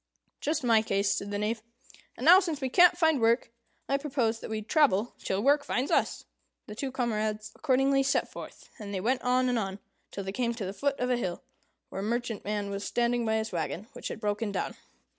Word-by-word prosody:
"Just 305 -1 -1
my 230 -3 +5
case," 200 -2 +1
said 200 - -2
the 205 - -2
Knave. 215 +2 -1 0.6
"And 250 - -5
now, 360 +4 +9
since 335 -6 -2
we 265 -2 -2
can't 355 +4 +6
find 320 -6 +3
work, 230 +1 +2 0.4
I 275 - +2
propose 255 -6 0
that - - -8
we 215 -1 -3
travel 240 - +2
till 195 +2 -2
work 285 +2 +4
finds 260 0 -1
us." - - +1 0.4
The 210 - -8
two 265 +5 -4
comrades 215 -4 -2
accordingly 275 -1 +2
set 275 +1 +1
forth, - - -10
and 205 -2 -6
they - - -1
went 250 +7 0
on 255 +1 +2
and 245 -2 +1
on, 195 -2 -3 0.3
till 200 - -6
they 195 - -4
came 235 +2 -1
to 220 -4 -4
the 190 - -4
foot 280 +5 -1
of 250 0 0
a 250 - +2
hill, 185 -7 -3 0.5
where 195 - -5
a - - -4
merchantman 210 -3 -2
was 200 0 -4
standing 240 0 0
by 220 - +2
his 220 0 -2
wagon, 175 +4 -3
which - - -6
had - - -6
broken 210 0 -1
down. - - -2
230 Hz, 215 wpm, -29 LUFS, 210-265 Hz, 0.6 s, now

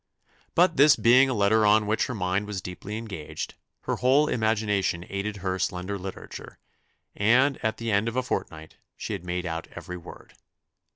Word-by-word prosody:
But 175 -1 +4
this 145 +1 +7
being 130 +3 +5
a - - 0
letter 105 +2 +3
on 105 +1 +4
which 110 +2 0
her 125 - -4
mind 95 +1 -1
was 105 -2 -4
deeply 95 +3 -7
engaged, 100 -9 -6 0.3
her - - -2
whole 135 +4 +4
imagination 105 -7 0
aided 100 +1 -4
her 95 0 -1
slender 90 +1 -2
literature, 95 0 -8 0.6
and 125 +6 +3
at 110 0 0
the 115 -1 -3
end 100 +2 +2
of 115 - -3
a 130 - +1
fortnight 80 -9 -5 0.2
she - - -4
had 95 -4 -5
made 90 0 -3
out 80 -1 -4
every 90 - -7
word. 85 - -13
105 Hz, 175 wpm, -26 LUFS, 95-115 Hz, 0.6 s, this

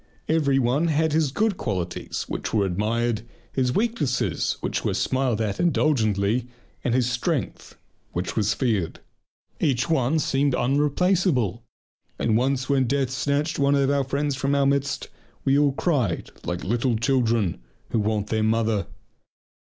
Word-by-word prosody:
Every 150 -4 +2
one 135 +6 +2
had 160 0 +1
his 155 -3 +2
good 210 +4 +1
qualities 90 -5 -3
which - - -3
were 100 -2 +3
admired, 110 +5 0 0.3
his 125 -2 +1
weaknesses 200 - 0
which - - -2
were - - 0
smiled 130 -4 0
at 105 -3 -2
indulgently, 120 - +1 0.4
and 120 - +1
his 125 -2 +2
strength 125 +4 -2 0.3
which 90 +1 -3
was 105 -2 +1
feared. 105 -10 -1 0.6
Each 130 -4 +1
one 140 0 +2
seemed 140 -2 +1
unreplaceable, 145 - +1 0.6
and 110 - +1
once 130 +2 +1
when 135 -3 +2
death 135 0 0
snatched 145 +4 -1
one 140 0 +3
of 140 0 +2
our 140 -1 +2
friends 140 +1 -1
from 140 +1 0
our 140 0 +3
midst 140 0 0 0.4
we 135 - +4
all 145 -1 +3
cried 130 - 0
like 90 0 -3
little 120 +4 +1
children 115 - +1 0.3
who 115 - +1
want 105 -1 -1
their 110 -1 +1
mother. 110 -2 +1
130 Hz, 145 wpm, -24 LUFS, 110-140 Hz, 0.6 s, we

